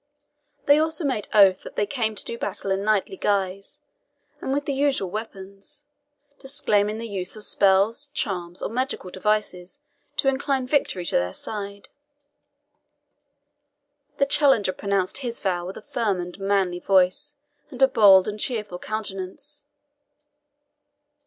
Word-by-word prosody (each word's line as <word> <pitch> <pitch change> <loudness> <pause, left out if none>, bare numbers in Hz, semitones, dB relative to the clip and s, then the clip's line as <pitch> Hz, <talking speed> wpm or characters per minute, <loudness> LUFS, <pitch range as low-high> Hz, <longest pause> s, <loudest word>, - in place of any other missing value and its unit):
They 285 +1 +6
also 315 0 0
made 255 -7 -1
oath 195 -3 +6
that - - -11
they 205 - +1
came 220 -1 -2
to - - -3
do 235 - -3
battle 200 -3 -4
in 195 +1 0
knightly 205 -2 0
guise, 195 -1 -2 0.6
and - - -3
with 285 +1 -1
the 285 - -1
usual 270 -9 0
weapons, 200 +3 -8 0.6
disclaiming 215 -6 +1
the 230 +1 -5
use 190 -3 -4
of 215 - -7
spells, 200 +9 +2
charms, 180 -10 -4
or - - -2
magical 250 -6 -3
devices 210 +2 -2 0.4
to - - +1
incline 270 -1 +1
victory 250 -10 0
to - - +1
their 90 +1 -1
side. 200 -1 -7 2.3
The 280 - +3
challenger 275 -9 +3
pronounced 195 +2 -1
his 240 -4 -4
vow 175 -3 -1
with 190 - -7
a - - -10
firm 210 -6 -1
and 175 +2 -7
manly 195 -3 0
voice, 190 +11 +2 0.3
and 255 -5 -10
a - - +8
bold 195 -6 +6
and 210 0 -4
cheerful 210 -7 -2
countenance. 215 +8 -5
205 Hz, 140 wpm, -24 LUFS, 190-260 Hz, 2.3 s, a